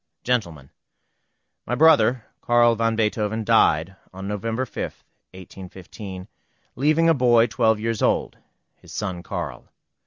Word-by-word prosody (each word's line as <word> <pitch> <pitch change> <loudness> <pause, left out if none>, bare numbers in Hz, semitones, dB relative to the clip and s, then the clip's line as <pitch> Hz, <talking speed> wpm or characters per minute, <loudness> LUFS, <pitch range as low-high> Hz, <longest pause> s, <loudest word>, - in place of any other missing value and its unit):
GENTLEMEN, 85 - -2 1.0
My 125 - -1
brother, 130 -5 +4 0.2
Carl 120 -1 +4
van 115 0 0
Beethoven, 110 0 -1
died 95 -5 +2 0.2
on 95 +1 -8
November 115 +5 -3
5, 110 - -7 0.5
1815, 95 +1 -10 0.5
leaving 155 +5 +2
a 165 - +5
boy 120 -4 +4
twelve 110 -1 +1
years 115 -1 -2
old, - - 0 0.4
his - - -17
son 95 -4 -4
Carl. - - -6
110 Hz, 120 wpm, -23 LUFS, 95-120 Hz, 1.0 s, a